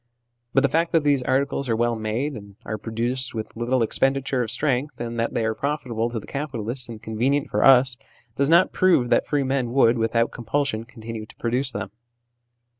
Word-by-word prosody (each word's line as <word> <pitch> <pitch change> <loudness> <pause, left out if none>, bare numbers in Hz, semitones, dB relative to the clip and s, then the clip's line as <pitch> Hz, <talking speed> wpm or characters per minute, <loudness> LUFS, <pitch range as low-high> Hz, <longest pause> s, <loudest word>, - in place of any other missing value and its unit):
But 135 - +5
the - - +5
fact 165 +5 0
that 165 -2 +3
these 145 -2 +3
articles 135 +1 0
are 115 - +2
well 120 +1 +1
made, 110 +7 -2
and 100 -4 -10
are 110 +1 -4
produced 120 +4 -1
with 110 -1 -5
little 120 +1 +1
expenditure 135 +3 0
of 115 - -2
strength, 135 +3 0
that 115 -1 -3
they 115 - +1
are 110 - 0
profitable 120 -4 -2
to 120 -1 -4
the - - -12
capitalists 125 -4 -4
and 115 -2 -7
convenient 125 +6 -1
for 105 - +1
us, 130 -1 +6 0.4
does 140 +1 +1
not 170 +3 +5
prove 170 -10 +3
that - - +3
free 145 -2 +1
men 130 -2 -1
would, 120 -3 +4
without 115 +1 +1
compulsion, 120 -1 -2
continue 115 -2 -8
to - - -16
produce 125 +3 -1
them. - - -5
125 Hz, 190 wpm, -23 LUFS, 115-140 Hz, 0.4 s, us